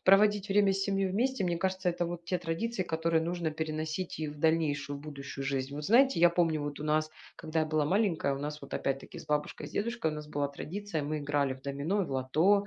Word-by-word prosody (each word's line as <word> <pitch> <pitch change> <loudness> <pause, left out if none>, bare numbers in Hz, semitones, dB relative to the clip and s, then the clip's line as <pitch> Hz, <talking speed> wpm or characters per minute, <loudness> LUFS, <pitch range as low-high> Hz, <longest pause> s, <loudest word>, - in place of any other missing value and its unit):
проводить 205 +1 +5
время 200 0 +5
с 195 0 -1
семьей 195 -1 +1
вместе, 235 +4 0
мне 175 -1 +1
кажется, 190 0 0
это 175 0 0
вот 170 0 -5
те 180 +2 0
традиции, 185 +6 -2
которые 160 -1 +1
нужно 170 -1 -1
переносить 155 +3 -3
и 155 - -1
в 150 0 -8
дальнейшую, 145 -3 +1
будущую 140 -2 -7
жизнь. 135 0 -2
Вот 150 - -5
знаете, 255 - +5
я 175 0 +7
помню, 165 -3 +2
вот 145 -1 -4
у - - -4
нас, 155 +1 +1 0.2
когда 160 +1 -2
я - - +3
была 155 -1 +1
маленькая, 175 -5 +2
у - - -5
нас 150 +1 -5
вот, 140 - -10
опять-таки, 135 0 -2
с - - -10
бабушкой 150 0 -1
и - - -7
с - - -16
дедушкой 230 -5 0
у - - -4
нас 150 0 -7
была 145 -1 -1
традиция: 170 +4 -4
мы 155 +2 -2
играли 145 -2 0
в 130 - -16
домино, 140 +9 -1
и - - -3
в - - -8
лото. 160 +10 +3
160 Hz, 235 wpm, -31 LUFS, 145-190 Hz, 0.2 s, я